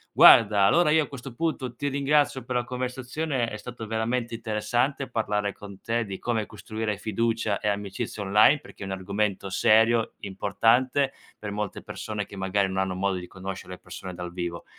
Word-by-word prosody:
Guarda 105 Hz, -2 st, +8 dB
allora 150 Hz, -, +5 dB
io 160 Hz, 0 st, +5 dB
a -, -, -7 dB
questo 135 Hz, -2 st, -9 dB
punto 135 Hz, -5 st, -2 dB
ti 145 Hz, +4 st, -2 dB
ringrazio 140 Hz, -1 st, +1 dB
per 125 Hz, -, -3 dB
la 125 Hz, -, +2 dB
conversazione, 130 Hz, +2 st, -2 dB
è 105 Hz, -, -6 dB
stato 115 Hz, +1 st, -8 dB
veramente 115 Hz, +2 st, -1 dB
interessante 120 Hz, +5 st, -1 dB
parlare 105 Hz, -2 st, -1 dB
con 100 Hz, -1 st, -12 dB
te 115 Hz, 0 st, -1 dB
di 95 Hz, -2 st, -6 dB
come 115 Hz, -3 st, -1 dB
costruire 110 Hz, 0 st, -4 dB
fiducia 110 Hz, 0 st, -1 dB
e 105 Hz, -, -3 dB
amicizia 105 Hz, +1 st, -3 dB
online 105 Hz, +9 st, +5 dB
perché -, -, -11 dB
è -, -, -4 dB
un 95 Hz, -, -4 dB
argomento 100 Hz, +1 st, -2 dB
serio, 110 Hz, +4 st, +4 dB
importante 115 Hz, +8 st, +2 dB, 0.3 s
per 105 Hz, -1 st, -6 dB
molte 105 Hz, -1 st, -4 dB
persone 105 Hz, -2 st, -5 dB
che 100 Hz, -, -11 dB
magari 95 Hz, +1 st, +1 dB
non 95 Hz, -, -4 dB
hanno 95 Hz, -1 st, 0 dB
modo 95 Hz, 0 st, 0 dB
di 90 Hz, 0 st, -7 dB
conoscere 95 Hz, 0 st, -7 dB
le 90 Hz, -, -10 dB
persone 95 Hz, -1 st, -8 dB
dal 90 Hz, 0 st, -6 dB
vivo. 85 Hz, -1 st, -4 dB
110 Hz, 185 wpm, -26 LUFS, 100-125 Hz, 0.3 s, Guarda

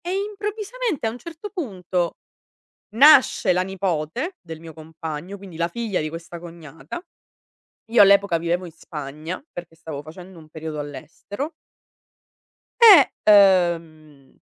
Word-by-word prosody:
E 350 Hz, -, -3 dB
improvvisamente, 415 Hz, -, -3 dB
a 220 Hz, -, 0 dB
un 240 Hz, -, -10 dB
certo 335 Hz, +6 st, -9 dB
punto, 185 Hz, -, -3 dB, 0.8 s
nasce 260 Hz, -6 st, +6 dB
la 180 Hz, -, +1 dB
nipote 190 Hz, -, -3 dB
del 165 Hz, -3 st, -9 dB
mio 165 Hz, -1 st, -11 dB
compagno, 160 Hz, +3 st, -8 dB
quindi 190 Hz, -4 st, -12 dB
la 170 Hz, +1 st, 0 dB
figlia 225 Hz, -1 st, -3 dB
di 155 Hz, 0 st, -3 dB
questa 165 Hz, +1 st, -8 dB
cognata. 165 Hz, -, -10 dB, 0.9 s
Io 230 Hz, 0 st, +5 dB
all'epoca 200 Hz, -3 st, +5 dB
vivevo 170 Hz, +2 st, -2 dB
in 170 Hz, -, -10 dB
Spagna 155 Hz, -, -8 dB
perché 175 Hz, -2 st, -9 dB
stavo 160 Hz, -3 st, -8 dB
facendo 175 Hz, +4 st, -12 dB
un 155 Hz, -1 st, -15 dB
periodo 155 Hz, -1 st, -6 dB
all'estero 160 Hz, -, -7 dB, 1.3 s
E, 390 Hz, -, +9 dB, 0.7 s
uhm, 155 Hz, -4 st, -19 dB
175 Hz, 130 wpm, -22 LUFS, 160-240 Hz, 1.3 s, E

